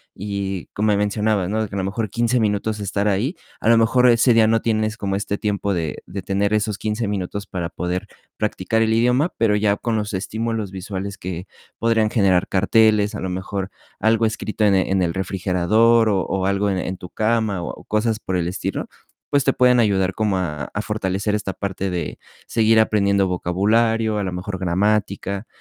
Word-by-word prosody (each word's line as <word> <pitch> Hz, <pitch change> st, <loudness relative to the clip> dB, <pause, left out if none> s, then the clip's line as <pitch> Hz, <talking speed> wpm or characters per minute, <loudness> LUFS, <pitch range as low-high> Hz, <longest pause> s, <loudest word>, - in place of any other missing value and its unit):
y 100 Hz, -2 st, -4 dB
como 105 Hz, 0 st, +2 dB
mencionabas, 105 Hz, -2 st, 0 dB
¿no?, 110 Hz, +1 st, 0 dB
de 105 Hz, -, -5 dB
que 100 Hz, -, -7 dB
a -, -, -2 dB
lo -, -, -1 dB
mejor 105 Hz, +1 st, -2 dB
15 120 Hz, +1 st, +1 dB
minutos 105 Hz, 0 st, 0 dB
estar 100 Hz, +1 st, -1 dB
ahí, 110 Hz, -, 0 dB, 0.3 s
a -, -, -1 dB
lo 115 Hz, -, +6 dB
mejor 125 Hz, +2 st, +4 dB
ese 120 Hz, +1 st, +5 dB
día 110 Hz, -1 st, +6 dB
no 115 Hz, 0 st, +2 dB
tienes 110 Hz, -1 st, 0 dB
como 100 Hz, -2 st, -2 dB
este 100 Hz, 0 st, -2 dB
tiempo 100 Hz, -1 st, -1 dB
de 80 Hz, -3 st, -3 dB
de 95 Hz, +2 st, -6 dB
tener 100 Hz, +3 st, 0 dB
esos 105 Hz, -1 st, 0 dB
15 110 Hz, 0 st, -2 dB
minutos 100 Hz, 0 st, -3 dB
para 85 Hz, -2 st, -4 dB
poder 90 Hz, +1 st, -3 dB, 0.3 s
practicar 105 Hz, +1 st, 0 dB
el 110 Hz, 0 st, +1 dB
idioma, 125 Hz, +8 st, +2 dB
pero 110 Hz, -2 st, +3 dB
ya 105 Hz, -1 st, +2 dB
con 115 Hz, -2 st, -2 dB
los 105 Hz, -1 st, -2 dB
estímulos 110 Hz, +2 st, -2 dB
visuales 95 Hz, +1 st, -5 dB
que 90 Hz, +1 st, -6 dB, 0.3 s
podrían 110 Hz, -1 st, +2 dB
generar 95 Hz, -5 st, +3 dB
carteles, 105 Hz, +2 st, +3 dB
a -, -, -5 dB
lo 95 Hz, -, -3 dB
mejor 95 Hz, +1 st, -4 dB, 0.3 s
algo 115 Hz, +1 st, +3 dB
escrito 110 Hz, 0 st, -2 dB
en 100 Hz, -1 st, +4 dB
en 95 Hz, 0 st, +1 dB
el 85 Hz, -2 st, 0 dB
refrigerador, 100 Hz, +5 st, +2 dB
o 95 Hz, -2 st, +2 dB
o 95 Hz, -1 st, -1 dB
algo 100 Hz, +1 st, +1 dB
en 95 Hz, -, 0 dB
en 90 Hz, 0 st, -4 dB
tu 90 Hz, -, -10 dB
cama, 110 Hz, -4 st, 0 dB
o -, -, -7 dB
cosas 110 Hz, +1 st, 0 dB
por 95 Hz, -, -3 dB
el 85 Hz, -1 st, -1 dB
estilo, 90 Hz, -, -3 dB, 0.5 s
pues, 140 Hz, -2 st, +3 dB
te 135 Hz, -, +3 dB
pueden 125 Hz, -1 st, +4 dB
ayudar 95 Hz, -4 st, +2 dB
como 105 Hz, -2 st, 0 dB
a 75 Hz, -6 st, -3 dB
a 100 Hz, -, -1 dB
fortalecer 105 Hz, -1 st, -2 dB
esta 100 Hz, -2 st, -3 dB
parte 95 Hz, -1 st, -3 dB
de 85 Hz, -4 st, -4 dB, 0.3 s
seguir 110 Hz, 0 st, +3 dB
aprendiendo 100 Hz, -3 st, +2 dB
vocabulario, 110 Hz, +5 st, +1 dB
a -, -, -1 dB
lo 95 Hz, -, -3 dB
mejor 95 Hz, +1 st, -5 dB
gramática. 100 Hz, +2 st, 0 dB
105 Hz, 195 wpm, -21 LUFS, 95-110 Hz, 0.5 s, lo